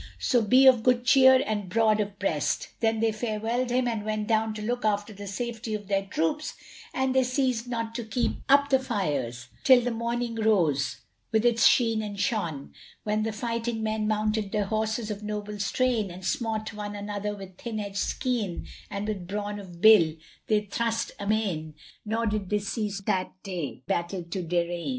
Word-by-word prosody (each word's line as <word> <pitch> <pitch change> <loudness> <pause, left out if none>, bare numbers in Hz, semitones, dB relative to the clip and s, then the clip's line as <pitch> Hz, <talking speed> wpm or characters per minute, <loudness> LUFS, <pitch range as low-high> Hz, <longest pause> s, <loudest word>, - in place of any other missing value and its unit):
So 245 - +2
be 255 +5 +5
of 255 -3 +7
good 245 +1 +2
cheer 260 0 +7
and 210 -3 -2
broad 215 +1 +3
of 205 -1 -2
breast." 165 -7 -1
Then 225 -1 +1
they 225 -1 +3
farewelled 225 +3 -2
him 250 0 +1
and 225 -3 -2
went 215 0 -2
down 220 -1 +1
to 215 - -5
look 245 +3 -2
after 210 0 0
the 200 0 -8
safety 230 +1 -4
of 205 -2 -7
their 195 -1 0
troops; 205 - -1 0.4
and 260 0 0
they 260 0 +4
ceased 255 -2 0
not 230 -2 -3
to 235 0 -4
keep 230 +3 -1
up 280 +1 +5
the 265 - +5
fires 140 - -2
till 260 -2 +7
the 245 +1 -1
morning 235 +1 -2
rose 170 - +1 0.3
with 220 +1 +2
its 235 -2 +5
sheen 225 -3 +3
and 205 -2 -6
shone, 170 -10 -2 0.3
when 215 0 0
the 220 +1 -1
fighting 230 +1 -3
men 215 0 -1
mounted 215 -1 0
their 210 -2 0
horses 220 +1 -1
of 205 0 -5
noble 210 0 -5
strain 225 0 +1
and 180 +1 -9
smote 220 +1 -2
one 210 -1 -5
another 205 0 -4
with 190 -2 -11
thin 225 -3 -4
edged 200 -1 -5
skean 220 -7 -1 0.2
and 200 +1 -4
with 195 -5 -4
brawn 205 +1 -3
of 175 -4 -11
bill 190 -8 +7 0.3
they 215 -1 +3
thrust 230 +2 -2
amain 200 -7 -1 0.3
nor 225 +2 -1
did 210 -3 -1
they 210 - +2
cease 205 -1 -3
that 185 -1 0
day 175 -9 -5
battle 175 +1 -2
to 170 +3 -4
darraign. 175 +2 -1
215 Hz, 185 wpm, -27 LUFS, 200-230 Hz, 0.4 s, of